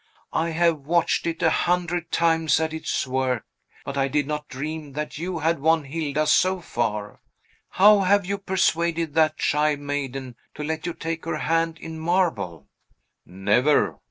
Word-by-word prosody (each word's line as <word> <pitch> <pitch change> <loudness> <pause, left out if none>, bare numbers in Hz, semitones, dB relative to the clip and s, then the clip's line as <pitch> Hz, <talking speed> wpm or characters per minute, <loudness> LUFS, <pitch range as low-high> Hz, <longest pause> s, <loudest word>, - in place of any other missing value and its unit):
I 165 +1 0
have 165 -1 +2
watched 170 0 +1
it 165 -1 -3
a 160 - +4
hundred 175 -1 0
times 165 -2 +2
at 160 0 -1
its 160 - -2
work; 130 -2 -1 0.4
but 140 - -5
I 135 - +2
did 145 +1 0
not 150 +1 -4
dream 150 +2 -6
that 150 +1 -5
you 175 +1 -3
had 165 0 0
won 160 +2 +3
Hilda 150 +1 -2
so 185 +4 +3
far! 110 -10 -3 0.5
How 205 +2 +6
have 200 0 +3
you 200 +1 -2
persuaded 170 -4 0
that 155 0 +2
shy 150 0 +2
maiden 135 -3 -5 0.2
to 150 - -5
let 160 +2 -3
you 175 - -3
take 165 0 -4
her 165 - -2
hand 165 0 0
in 160 0 -8
marble?" 160 - -1 0.6
"Never! 105 +10 +2
160 Hz, 160 wpm, -24 LUFS, 145-170 Hz, 0.6 s, How